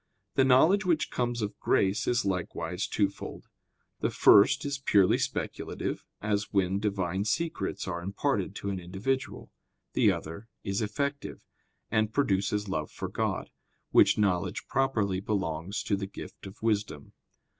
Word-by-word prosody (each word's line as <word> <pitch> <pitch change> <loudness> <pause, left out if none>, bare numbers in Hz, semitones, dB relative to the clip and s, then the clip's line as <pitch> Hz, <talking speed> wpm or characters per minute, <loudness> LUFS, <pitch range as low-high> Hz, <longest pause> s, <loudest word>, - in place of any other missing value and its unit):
The 135 - +4
knowledge 155 +11 +5
which 170 -4 +1
comes 120 -2 -1
of 105 - -4
grace 95 +1 +1
is 120 -3 +2
likewise 90 0 -2
twofold: 100 -2 -2 0.5
the - - +1
first 100 +7 +6
is 140 -1 -2
purely 100 -8 +4
speculative, - - -3 0.2
as 105 -1 -1
when 95 -1 +1
Divine 100 -3 -1
secrets 155 - -2
are 85 -2 -3
imparted 95 +3 -1
to 100 - -3
an 95 - -3
individual; 105 +9 -3 0.4
the - - +4
other 85 +8 -6 0.2
is 100 +2 -1
effective, 140 +7 -3 0.5
and 110 0 +2
produces 105 -5 +1
love 80 -5 -2
for - - -6
God; - - -2 0.4
which - - +6
knowledge 95 -5 0
properly 110 -8 +1
belongs 95 -2 -2
to 100 - +1
the 100 0 -4
gift 100 - -10
of 95 +3 -13
wisdom. 105 -10 -1
100 Hz, 140 wpm, -29 LUFS, 95-120 Hz, 0.5 s, first